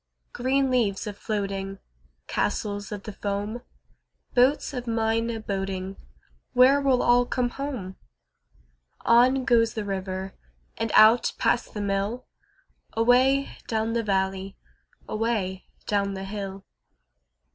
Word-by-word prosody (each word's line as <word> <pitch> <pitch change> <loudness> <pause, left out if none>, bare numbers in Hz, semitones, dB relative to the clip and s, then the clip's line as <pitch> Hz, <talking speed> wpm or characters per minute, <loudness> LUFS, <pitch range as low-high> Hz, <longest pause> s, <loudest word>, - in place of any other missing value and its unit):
Green 265 +2 +1
leaves 220 -6 +1
a 210 - -4
floating, 195 -2 -3 0.5
Castles 205 -1 -2
of 205 -2 -5
the 215 - -7
foam, 205 +3 -3 0.7
Boats 265 +4 +3
of 250 -2 -5
mine 225 0 0
a 225 -1 -3
boating— 195 -2 -4 0.6
Where 260 +3 +6
will 265 -3 +2
all 245 0 +4
come 245 -1 0
home? 240 -9 -5 1.0
On 250 +3 +4
goes 230 -3 +3
the 215 -2 -3
river 190 -1 -4 0.4
And 225 -1 -2
out 220 +3 +6
past 235 - 0
the 210 - -2
mill, 200 +4 -2 0.7
Away 255 +4 +3
down 225 0 -1
the 235 - +1
valley, 195 -2 -1 0.5
Away 215 -4 -2 0.2
down 200 -1 0
the 190 0 -5
hill. 195 -1 -6
220 Hz, 120 wpm, -26 LUFS, 195-245 Hz, 1.0 s, Where